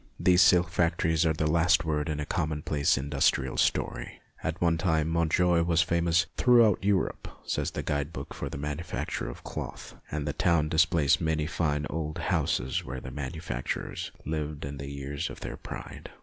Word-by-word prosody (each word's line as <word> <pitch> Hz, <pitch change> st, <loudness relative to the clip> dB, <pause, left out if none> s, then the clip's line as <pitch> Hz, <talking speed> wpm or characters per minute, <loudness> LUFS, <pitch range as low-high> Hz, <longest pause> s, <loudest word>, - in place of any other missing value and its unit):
These 90 Hz, 0 st, +5 dB
silk 90 Hz, -1 st, +5 dB
factories 80 Hz, -1 st, +1 dB
are 80 Hz, -, +2 dB
the 80 Hz, 0 st, -1 dB
last 80 Hz, +1 st, +3 dB
word 75 Hz, 0 st, -1 dB
in 75 Hz, -1 st, -2 dB
a 75 Hz, -, -2 dB
commonplace 75 Hz, -3 st, 0 dB
industrial 70 Hz, +1 st, +1 dB
story. -, -, -1 dB, 0.2 s
At 80 Hz, +2 st, -2 dB
one 85 Hz, -2 st, +2 dB
time 80 Hz, -3 st, +1 dB
Montjoie 85 Hz, +1 st, +2 dB
was 85 Hz, -1 st, +3 dB
famous 85 Hz, 0 st, +2 dB
" -, -, -37 dB
throughout 115 Hz, -6 st, +5 dB
Europe," 100 Hz, -1 st, 0 dB, 0.2 s
says -, -, -1 dB
the -, -, -5 dB
guide 75 Hz, +1 st, -1 dB
book -, -, -7 dB
for -, -, -5 dB
the -, -, -6 dB
manufacture 75 Hz, -2 st, -4 dB
of -, -, -9 dB
cloth, -, -, -7 dB, 0.2 s
and 75 Hz, -1 st, -3 dB
the 75 Hz, -, -1 dB
town 85 Hz, -3 st, +2 dB
displays 80 Hz, 0 st, +3 dB
many 80 Hz, -2 st, 0 dB
fine 75 Hz, -2 st, -1 dB
old 75 Hz, -1 st, -4 dB
houses 65 Hz, +2 st, 0 dB
where 65 Hz, -, -6 dB
the 65 Hz, -, -8 dB
manufacturers 65 Hz, -1 st, -4 dB
lived 75 Hz, -1 st, -3 dB
in 70 Hz, 0 st, -6 dB
the 70 Hz, 0 st, -6 dB
years 70 Hz, +3 st, -4 dB
of -, -, -10 dB
their -, -, -5 dB
pride. -, -, -8 dB
80 Hz, 180 wpm, -28 LUFS, 75-85 Hz, 0.2 s, These